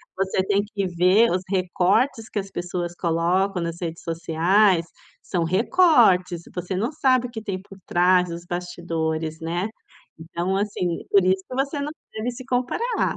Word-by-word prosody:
você 190 0 0
tem 200 0 +2
que 200 -2 -3
ver 185 +6 +4
os 180 +1 0
recortes 195 +6 +1
que 210 - -2
as 195 0 -6
pessoas 175 -1 -4
colocam 175 +3 0
nas 170 0 -3
redes 165 -1 -4
sociais, 170 +3 +2 0.4
são 175 -3 -1
recortes, 190 - +4
você 180 +2 -4
não 230 +8 -1
sabe 255 -4 +2
o - - -14
que 220 -2 -6
tem 190 -3 -4
por 195 0 -14
trás 180 0 +3
dos 170 +1 -7
bastidores, 165 -2 -3
né, 175 +5 -2 0.5
então 170 +3 -3
assim, 190 -4 -2
por 200 -2 +5
isso 190 +1 +2
que 255 - -5
você 280 +2 -1
não 295 +1 -3 0.2
deve 225 +3 -3
se 250 +1 -10
comparar. 265 - -1
185 Hz, 165 wpm, -23 LUFS, 175-215 Hz, 0.5 s, por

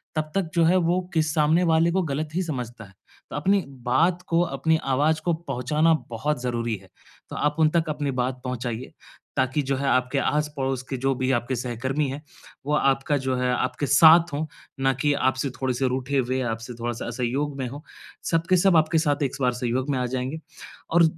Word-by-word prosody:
तब 155 -1 -2
तक 185 -5 0
जो 170 - +4
है 175 +3 +4
वो 175 +1 +2
किस 160 -2 +1
सामने 155 +3 +3
वाले 165 +1 +4
को 190 +2 +1
गलत 150 0 -2
ही 185 - +1
समझता 125 -8 -5
है। 95 - -17 0.4
त - - -7
अपनी 195 +7 +2 0.2
बात 165 +8 +2
को 170 0 +2
अपनी 160 -2 +1
आवाज़ 150 +4 +2
को 175 - +2
पहुँचाना 150 +1 +1 0.2
बहुत 130 +5 -2
ज़रूरी 120 -2 -1
है। 95 - -19 0.4
तो - - -7
आप 150 0 0
उन 155 - +5
तक 165 0 0
अपनी 145 -2 -2
बात 125 +1 -1
पहुँचाइए, 125 -1 -4 0.5
ताकि 130 +3 +1
जो 135 - +2
है 140 +1 -2
आपके 130 +2 +1
आस-पड़ोस 140 -4 -1
के 135 - -2
जो 135 +2 +1
भी 130 +1 0
आपके 120 +1 0
सहकर्मी 130 +4 -2
हैं, 140 +2 -5 0.4
वो 150 - -1
आपका 135 0 +2
जो 130 -1 -1
है 125 0 +1
आपके 130 +3 -1
साथ 165 +3 +7
हो, 155 +2 -2 0.3
ना 135 0 +2
कि 145 +3 +1
आपसे 130 0 0
थोड़े-से 130 0 -1
रूठे 130 +2 -1
हुए 130 0 0
आपसे 115 0 -4
थोड़ा-सा 120 0 -3
असहयोग 130 +4 -2
में 130 - -2
हों। 140 +4 -8 0.5
सब 165 -1 +2
के 185 - +5
सब 180 -1 +4
आपके 160 +1 +3
साथ 145 -2 +1
एक 135 - 0
बार 125 -1 +3
सहयोग 125 +2 -2
में 135 - 0
आ 125 - 0
जाएँगे। 130 +4 -3 0.5
और 170 +1 +5
140 Hz, 205 wpm, -25 LUFS, 125-155 Hz, 0.5 s, साथ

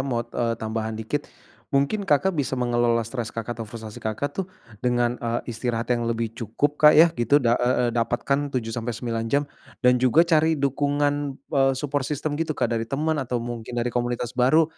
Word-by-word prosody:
mau, 120 -3 -1
eee, 115 0 -1
tambahan 110 0 -3
dikit, 130 +7 -3 0.4
mungkin 145 +9 +1
Kakak 150 +7 +3
bisa 140 -4 -1
mengelola 120 -1 +1
stres 115 0 -4
Kakak 115 +1 -5
atau 115 - -4
frustasi 110 -1 -9
Kakak, 110 +6 -2
tuh 190 +4 -3 0.3
dengan, 120 -1 +1
eee, 120 0 -1
istirahat 115 +1 -1
yang 120 -1 0
lebih 115 -1 -2
cukup, 120 +6 -1
Kak, 150 0 +8
ya 165 +1 +7
gitu. 120 -2 +2
Da 120 -1 +4
e 125 - +2 0.2
e - - -9
dapatkan 120 +5 0
7 115 -3 -2
sampai 120 0 -3
9 115 -2 -3
jam 140 +3 +2 0.4
dan 125 0 +5
juga 130 +7 +5
cari 160 -1 +3
dukungan, 145 +1 +1 0.4
eee, 135 -1 +4
support 145 0 -1
system 150 +1 -2
gitu, 160 -2 -1
Kak, - - 0
dari 115 0 -2
teman 155 +3 0
atau 125 -1 -2
mungkin 120 0 -6
dari 120 +1 0
komunitas 120 0 -2
baru. 130 +6 +4
125 Hz, 190 wpm, -24 LUFS, 115-145 Hz, 0.4 s, Kak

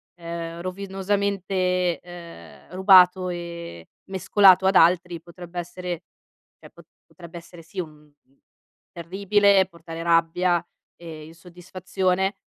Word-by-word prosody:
ehm, 170 -1 -7
rovinosamente, 190 -1 -2
ehm, 175 -1 -13
rubato 185 -1 +5
e 170 - -8 0.2
mescolato 190 0 +4
ad 190 - +2
altri, 175 0 +3
potrebbe 175 +1 -9
essere 175 0 -6 0.6
cioè - - -15
po - - -17 0.3
potrebbe 170 -1 -12
essere 170 0 -13
sì 175 +4 -9
un 165 - -8 0.2
uhm, 140 -2 -38 0.5
terribile, 200 +3 +2
e 190 - +2
portare 165 -2 -10
rabbia 170 +1 +1 0.3
e 160 -3 -10
insoddisfazione; 185 +3 -3
180 Hz, 110 wpm, -23 LUFS, 170-190 Hz, 0.6 s, rubato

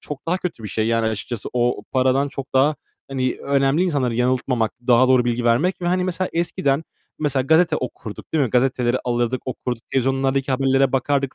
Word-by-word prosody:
çok 145 +1 -8
daha 175 +2 +1
kötü 170 -10 -5
bir 105 - -5
şey 110 +2 -1
yani 115 0 +1
açıkçası. 110 +1 -4
O 120 0 0
paradan 130 +2 +2
çok 135 -1 -8
daha, 145 +3 +3 0.3
hani, 130 -2 -1
önemli 140 +3 +2
insanları 140 -10 0
yanıltmamak, 125 -2 0
daha 125 +1 +5
doğru 130 -2 +4
bilgi 120 0 -1
vermek 150 +11 +2
ve, - - -1
hani, 180 +1 +1
mesela 185 0 -2
eskiden, 160 -3 0 0.3
mesela, 145 -3 0
gazete 160 +5 +3
okurduk, 115 -3 -7
değil 155 -3 +2
mi? 125 - -3
Gazeteleri 125 0 +1
alırdık, 120 +1 -1
okurduk. 125 -2 -4
Televizyonlardaki 135 +1 0
haberlere 135 0 +2
bakardık 135 0 0
130 Hz, 180 wpm, -21 LUFS, 125-140 Hz, 0.3 s, daha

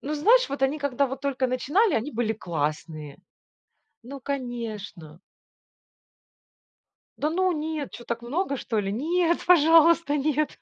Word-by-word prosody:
ну, 295 +2 -4
знаешь, 455 +12 +4
вот 275 0 -5
они, 275 +3 +1
когда 280 -1 0
вот 265 +1 -6
только 270 -2 -1
начинали, 300 - +1
они 235 +6 -2
были 225 -1 -1
классные. 155 -5 -4 0.9
Ну, 275 +3 -9
конечно. 225 - -6 2.0
Да, 300 - 0
ну, 370 +3 +1
нет, 310 -2 -4
чё, 240 - -10
так 235 0 -4
много 280 +3 -2
что 225 -3 -3
ли? 195 -1 -2
Нет, 340 +7 0
пожалуйста, 330 -2 +5
нет. 300 +1 -1
275 Hz, 135 wpm, -25 LUFS, 230-310 Hz, 2.0 s, пожалуйста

